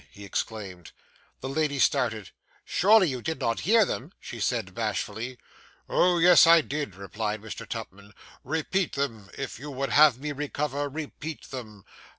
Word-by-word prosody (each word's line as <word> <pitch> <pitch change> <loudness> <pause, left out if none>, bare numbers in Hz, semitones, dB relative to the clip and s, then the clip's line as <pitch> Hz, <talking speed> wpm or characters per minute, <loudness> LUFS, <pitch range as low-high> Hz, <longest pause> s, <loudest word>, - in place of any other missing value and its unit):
he 100 +5 -12
exclaimed. 95 -4 -5 0.5
The 130 - -4
lady 150 0 0
started. 120 -7 +1 0.3
'Surely 205 0 +5
you 130 -4 -3
did 160 +4 -3
not 115 0 0
hear 225 -1 +6
them!' 100 - -5
she - - -8
said - - -1
bashfully. 120 +3 -3 0.5
'Oh, 180 -1 +3
yes, 170 -1 +7
I 165 0 +8
did!' 145 -9 -4
replied 105 +2 -4
Mr. 110 - -8
Tupman; 100 +1 -8 0.3
'repeat 160 +6 -1
them. 115 -8 -3
If 135 -4 -5
you 145 +3 -7
would 135 0 -3
have 150 -4 +6
me 150 +1 -4
recover, 145 0 -2
repeat 155 +1 -7
them. 110 -7 -8
140 Hz, 155 wpm, -27 LUFS, 110-155 Hz, 0.5 s, I